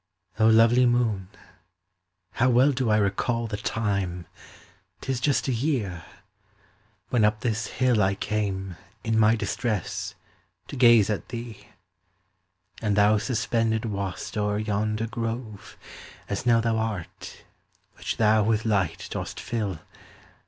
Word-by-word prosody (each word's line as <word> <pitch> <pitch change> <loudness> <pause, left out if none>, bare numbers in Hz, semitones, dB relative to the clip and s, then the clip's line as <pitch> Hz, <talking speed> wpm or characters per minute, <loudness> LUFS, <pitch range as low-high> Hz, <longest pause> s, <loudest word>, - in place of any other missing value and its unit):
O 110 - +5
lovely 115 +3 +5
moon, 110 -6 0 1.0
how 130 +2 +2
well 130 +4 +5
do 130 -3 -1
I 105 - +4
recall 110 +4 0
The 110 -2 -4
time,—'tis 100 - -5
just 140 +1 +1
a 130 - +1
year—when 115 - -5
up 105 +1 +2
this 110 -2 -1
hill 125 -4 +1
I 95 0 +2
came, 95 -3 -3 0.3
in 110 -1 +1
my 110 +1 +5
distress, 110 -1 -3 0.5
to - - -6
gaze 120 -5 +5
at 105 - -4
thee: 120 -2 -8 1.1
And 105 -3 0
thou 105 +1 +4
suspended 115 -1 0
wast 100 -3 -4
o'er 105 0 0
yonder 105 +1 -1
grove, 115 -2 -5 0.5
As 100 +5 -3
now 115 -1 +5
thou 115 -1 0
art, 110 -6 -5 0.5
which - - -4
thou 110 0 +4
with 110 +1 +1
light 95 -7 0
dost - - -5
fill. 105 -8 -3
110 Hz, 125 wpm, -25 LUFS, 100-115 Hz, 1.1 s, O